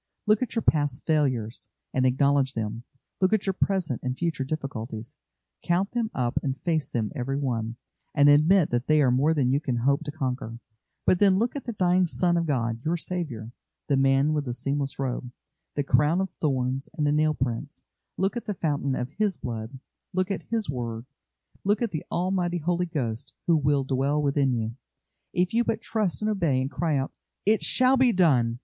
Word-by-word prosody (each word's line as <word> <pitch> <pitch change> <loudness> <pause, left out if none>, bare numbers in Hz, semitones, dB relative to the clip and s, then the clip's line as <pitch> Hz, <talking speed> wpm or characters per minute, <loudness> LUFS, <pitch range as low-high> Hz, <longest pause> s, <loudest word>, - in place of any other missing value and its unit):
Look 215 +1 +3
at 255 - -2
your 225 - 0
past 145 -4 +1
failures, 130 -8 0 0.2
and 130 0 +3
acknowledge 135 +1 +2
them; 115 +2 -4 0.3
look 185 +2 +3
at 215 - +2
your 195 - +1
present 185 -9 0
and 125 0 -3
future 165 -5 -1
difficulties, 125 -6 -5 0.5
count 180 +3 +1
them 235 -2 -1
up 120 -2 0
and 135 -1 -3
face 160 -6 0
them 110 -3 -2
every 135 0 -2
one, 115 -5 -2 0.4
and 145 -1 +6
admit 155 +5 +5
that 120 +1 -1
they 155 -1 +4
are 130 - +4
more 145 +6 +3
than 130 -4 +2
you 140 - +3
can 135 -5 -2
hope 140 +6 +2
to 145 - -3
conquer; 130 -5 -3 0.5
but 180 - +4
then 195 -2 +5
look 235 +6 0
at 280 - -5
the 235 - -3
dying 180 -2 +3
Son 175 +1 +1
of 170 -1 0
God, 115 -5 -1
your 165 +2 0
Saviour 150 -11 -4 0.4
the 140 - +4
Man 135 +2 +3
with 150 -2 -1
the 120 -2 -3
seamless 140 +2 -2
robe, 125 -2 -3 0.4
the 145 - 0
crown 150 +6 +3
of 190 -2 -1
thorns, 135 -2 -1
and 150 - +1
the 145 - +3
nail 155 +1 +2
prints; 130 +4 -3 0.3
look 195 +4 0
at 240 - -4
the 205 - -3
fountain 145 -5 -1
of 125 +2 -3
His 205 -5 +1
Blood; 115 +2 -5 0.4
look 185 +2 0
at 195 - -4
His 225 -2 -1
word; 120 -3 -4 0.6
look 205 +2 +2
at 235 -4 -1
the 155 - -3
Almighty 180 -1 0
Holy 175 +2 0
Ghost, 130 -4 -3
who 170 - +4
will 145 -2 +2
dwell 135 +2 0
within 140 -2 +2
you, 115 -1 -2 0.6
if 180 +2 0
you 235 +1 +3
but 225 - -1
trust 215 -3 -1
and 215 - +1
obey, 165 -10 +1
and 130 +2 -2
cry 155 +1 0
out: 135 0 -2 0.3
"It 215 +2 +3
shall 255 +1 +5
be 255 -2 +5
done! 130 - +3
145 Hz, 200 wpm, -26 LUFS, 130-180 Hz, 0.6 s, and